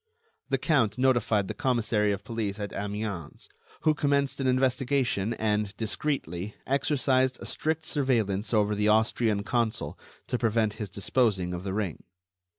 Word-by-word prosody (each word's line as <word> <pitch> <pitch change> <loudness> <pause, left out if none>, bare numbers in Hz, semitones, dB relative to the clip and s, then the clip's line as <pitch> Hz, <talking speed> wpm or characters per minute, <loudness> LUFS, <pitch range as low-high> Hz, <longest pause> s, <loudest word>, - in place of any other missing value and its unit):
The 135 - +2
count 130 - +2
notified 120 -6 +2
the - - -3
commissary 110 -4 +1
of 100 0 -3
police 110 -2 -3
at 100 0 -4
Amiens, 100 -5 -5 0.3
who 155 -1 +4
commenced 140 -2 +1
an 135 - 0
investigation 130 -4 +1
and, 105 -2 -1
discreetly, 105 - -2
exercised 130 -2 +2
a - - -8
strict 160 0 -1
surveillance 110 -9 0
over 105 -2 +3
the 105 0 +1
Austrian 110 -1 +2
consul 115 0 -1 0.3
to 125 - -2
prevent 110 -2 +1
his 105 - -3
disposing 100 -2 +1
of 90 0 -5
the 95 -1 -3
ring. 100 -7 -3
110 Hz, 145 wpm, -28 LUFS, 105-130 Hz, 0.3 s, who